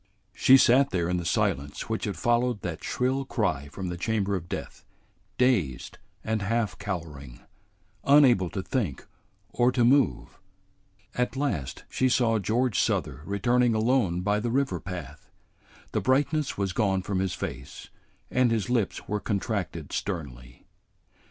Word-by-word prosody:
She 130 - +6
sat 135 +2 +5
there 85 -3 -1
in 90 +1 0
the 85 - -4
silence 70 -3 -1
which 110 0 -2
had 100 -5 -3
followed 120 +1 +1
that 85 -3 -5
shrill 130 +2 0
cry 90 - -1
from 90 +6 -6
the 90 - -4
chamber 100 -1 0
of 85 -2 -6
death, - - -6 0.5
dazed 105 - 0 0.2
and 110 -1 -1
half 110 -1 -1
cowering, 75 -11 -6 0.6
unable 130 - +5
to 95 - -4
think 100 - -2 0.5
or 120 +1 +3
to 125 -2 +2
move. 135 +2 +2 0.7
At 125 +1 -1
last 100 - -2
she 130 - +1
saw 115 -3 +2
George 115 +3 0
Souther - - 0
returning 120 +4 +2
alone 110 -6 +1
by 105 +2 +1
the 120 +2 -2
river 125 -8 0
path. 80 -5 -8 0.6
The - - -1
brightness 145 +3 +1
was 100 -2 -1
gone 95 -3 +1
from 95 -1 -2
his 95 -1 -1
face, 70 +2 -7 0.4
and 125 -1 +3
his 115 -1 -1
lips 115 -5 -1
were 105 +1 -1
contracted 100 - -3
sternly. 65 -10 -5
105 Hz, 145 wpm, -27 LUFS, 90-125 Hz, 0.7 s, She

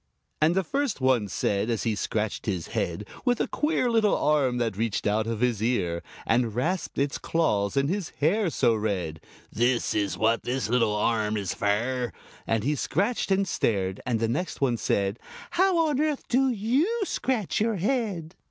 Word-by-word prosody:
And 160 +3 +4
the 190 - +2
first 280 - -1
one 130 -5 +2
said, 100 +3 -1
as 115 -4 -1
he 115 - +1
scratched 105 +1 -2
his 90 -6 -2
head 85 +4 -2 0.2
With 245 -2 +2
a - - +2
queer 300 -4 0
little 225 -3 +3
arm 140 -5 +2
that 115 -4 -1
reached 110 0 -1
out 110 +2 +1
of 115 -1 -3
his 120 -4 +1
ear 95 -8 0 0.2
And 115 -2 +1
rasped 170 +9 -1
its 140 0 0
claws 105 -10 0
in 140 0 +3
his 185 +1 -2
hair 180 +6 +2
so 120 -6 +2
red 95 -8 -2 0.3
"This 120 +2 +1
is 100 -2 -1
what 115 +1 +2
this 130 +2 -2
little 115 -3 +2
arm 110 0 +1
is 100 -3 -2
fer!" 120 +3 0 0.4
And 115 -2 +1
he 145 +4 +1
scratched 200 - 0
and 195 0 +2
stared, 95 - 0
and 120 -3 0
the 115 - +1
next 155 +11 -2
one 125 -4 +1
said 100 0 0 0.3
"How 370 0 +3
on 290 -1 +1
earth 305 -2 -1
do 265 +2 +3
you 260 - +1
scratch 240 - -1
your 225 0 +1
head?" 195 -6 -1
125 Hz, 180 wpm, -26 LUFS, -, 0.4 s, And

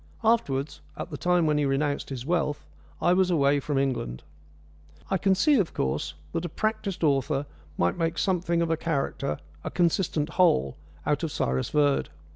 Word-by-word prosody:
Afterwards, 155 - +1 0.2
at - - -6
the - - -4
time 180 0 +2
when 150 -1 +2
he 145 - +2
renounced 140 +1 0
his 130 -2 -5
wealth, 150 -3 0 0.3
I 175 - +3
was 185 0 +3
away 145 -4 +3
from 140 0 -2
England. 125 - -1 0.9
I 190 - +2
can 195 +1 +3
see, 285 +6 +4
of 185 - -1
course, 75 +3 -1 0.2
that 165 - -2
a 175 - -3
practised 205 -1 -2
author 140 -1 +1 0.3
might 85 - +1
make 165 0 0
something 170 -1 +1
of 165 - -1
a 165 - +1
character 140 - -2 0.3
a - - -3
consistent 170 -3 +1
whole 70 - +3 0.3
out 150 0 +1
of 165 -3 -2
Cyrus 65 - -1
Verd. 145 -2 +2
155 Hz, 175 wpm, -27 LUFS, 135-175 Hz, 0.9 s, see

